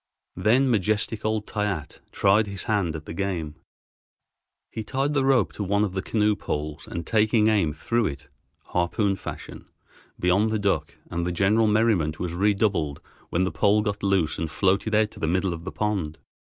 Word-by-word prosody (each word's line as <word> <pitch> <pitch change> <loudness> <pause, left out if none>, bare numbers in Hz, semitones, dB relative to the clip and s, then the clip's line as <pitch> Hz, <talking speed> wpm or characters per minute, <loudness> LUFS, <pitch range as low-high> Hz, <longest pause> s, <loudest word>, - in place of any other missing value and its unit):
Then 125 +6 +3
majestic 110 -1 0
old 110 -1 -1
Toyatte 100 -8 -3
tried 105 +2 +3
his 100 -2 -3
hand 100 -7 0
at 80 0 -7
the - - -7
game. 85 -5 -3 1.2
He 110 - -4
tied 135 +6 -1
the 140 -2 +2
rope 130 -6 +3
to 105 - -4
one 100 +2 +1
of 100 -3 -2
the 95 - -1
canoe 105 0 +1
poles, 75 -4 -4
and 85 -1 -5
taking 110 +1 +3
aim 100 -8 +2
threw 115 +9 0
it, 70 -3 -7 0.4
harpoon 95 +3 0
fashion, - - -8 0.5
beyond 95 +5 +3
the 110 - 0
duck, 100 -1 -1 0.2
and 85 0 -1
the - - 0
general 105 +5 +3
merriment 105 -8 +2
was 85 -2 -3
redoubled 95 -6 +1 0.3
when 90 - +1
the 95 - 0
pole 105 +6 +3
got 105 -1 -2
loose 95 -7 +1
and 80 -1 -2
floated 100 +5 +1
out 110 0 +3
to - - -13
the 80 - -1
middle 95 +2 +1
of 85 +1 -8
the 95 - -4
pond. 95 -8 -2
100 Hz, 180 wpm, -25 LUFS, 85-110 Hz, 1.2 s, Then